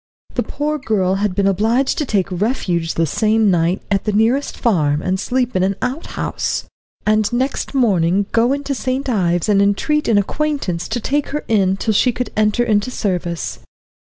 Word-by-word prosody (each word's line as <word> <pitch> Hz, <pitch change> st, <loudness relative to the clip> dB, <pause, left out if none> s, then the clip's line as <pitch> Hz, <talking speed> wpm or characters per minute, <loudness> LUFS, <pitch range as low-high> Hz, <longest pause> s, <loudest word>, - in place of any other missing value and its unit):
The -, -, 0 dB
poor 300 Hz, +1 st, -2 dB
girl 200 Hz, -8 st, 0 dB
had 205 Hz, -3 st, 0 dB
been 200 Hz, 0 st, +1 dB
obliged 225 Hz, +7 st, +1 dB
to 300 Hz, -, -1 dB
take 195 Hz, -4 st, 0 dB
refuge 180 Hz, -4 st, -1 dB
the 165 Hz, -, +2 dB
same 215 Hz, +5 st, +2 dB
night 175 Hz, +2 st, +1 dB
at 195 Hz, -1 st, +1 dB
the 210 Hz, -, +1 dB
nearest 230 Hz, +7 st, +1 dB
farm 150 Hz, -10 st, +1 dB
and 185 Hz, +1 st, 0 dB
sleep 250 Hz, +2 st, -1 dB
in 185 Hz, -, +2 dB
an 195 Hz, +1 st, +1 dB
outhouse, 260 Hz, +6 st, -3 dB, 0.4 s
and 215 Hz, 0 st, +2 dB
next 260 Hz, +3 st, -2 dB
morning 195 Hz, -6 st, +2 dB
to -, -, -32 dB
go 235 Hz, +2 st, +3 dB
into 280 Hz, 0 st, -1 dB
St. 265 Hz, +1 st, -2 dB
Ives 175 Hz, -8 st, +1 dB
and 200 Hz, -2 st, +4 dB
entreat 250 Hz, +10 st, +1 dB
an 220 Hz, -, +3 dB
acquaintance 205 Hz, -, -1 dB
to 245 Hz, -, -2 dB
take 285 Hz, +5 st, -1 dB
her 300 Hz, +1 st, -4 dB
in 195 Hz, -3 st, +2 dB
till 220 Hz, +2 st, 0 dB
she 250 Hz, +5 st, +3 dB
could 250 Hz, +1 st, -4 dB
enter 215 Hz, +2 st, +2 dB
into 215 Hz, 0 st, +1 dB
service. 180 Hz, -7 st, -3 dB
215 Hz, 185 wpm, -18 LUFS, 190-255 Hz, 0.4 s, and